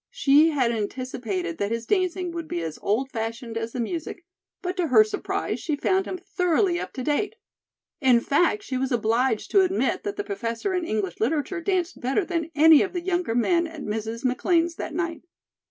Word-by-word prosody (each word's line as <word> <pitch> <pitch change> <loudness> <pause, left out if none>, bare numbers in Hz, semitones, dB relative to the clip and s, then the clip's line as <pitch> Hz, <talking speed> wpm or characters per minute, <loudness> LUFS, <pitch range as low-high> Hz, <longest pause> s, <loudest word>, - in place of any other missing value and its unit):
She 315 - +4
had 260 -6 +1
anticipated 210 -6 -3
that 200 - 0
his 230 +1 -3
dancing 365 - 0
would 335 -1 -5
be 175 - -3
as 160 -2 -5
old 260 +6 0
fashioned 225 0 -4
as 225 0 -3
the 250 - -5
music, 330 +7 -4 0.4
but 360 0 -2
to 355 -2 +1
her 430 - +7
surprise, 425 -1 -3
she 310 - -1
found 380 +6 +1
him 370 - -4
thoroughly 360 0 +1
up - - -5
to 255 - -5
date. 355 - 0 0.6
In 255 -4 +5
fact, 350 - +1
she 260 -9 -3
was 265 +1 -1
obliged 230 0 +1
to 395 - +6
admit 370 -7 +1
that 205 - -3
the 205 - -3
Professor 230 - -3
in 360 -2 -1
English 205 - -2
Literature 305 - -1
danced 370 -1 -1
better 270 +10 +1
than 335 -3 -2
any 310 0 +7
of 380 -2 -1
the 355 - -2
younger 350 -9 -1
men 335 +8 +2
at 320 -3 -9
Mrs. 225 +3 -4
McLean's 330 +7 +2
that 310 - -5
night. 335 -2 -2
295 Hz, 195 wpm, -25 LUFS, 230-355 Hz, 0.6 s, her